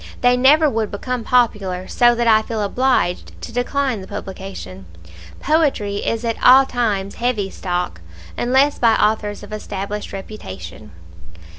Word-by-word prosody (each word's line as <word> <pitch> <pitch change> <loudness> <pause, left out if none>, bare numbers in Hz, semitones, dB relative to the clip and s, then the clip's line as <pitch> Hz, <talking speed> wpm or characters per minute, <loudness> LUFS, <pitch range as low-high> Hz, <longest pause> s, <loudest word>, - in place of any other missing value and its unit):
They 245 0 +4
never 290 +5 +5
would 225 -5 -1
become 250 +4 -4
popular, 200 -7 +1
so 240 -1 +3
that 235 0 0
I 220 -1 +5
feel 220 -1 -3
obliged 245 -4 0
to - - -6
decline 245 -1 -1
the 190 - -10
publication. 185 - -8 0.5
Poetry 280 -10 +1
is 230 +3 -2
at 230 -1 -3
all 265 +2 +8
times 210 -6 -1
heavy 225 -5 -2
stock, 175 - -3 0.3
unless 265 +4 +2
by 230 -2 +4
authors 210 -1 0
of - - -10
established 205 0 -5
reputation." 190 - -9
220 Hz, 140 wpm, -19 LUFS, 195-250 Hz, 0.5 s, all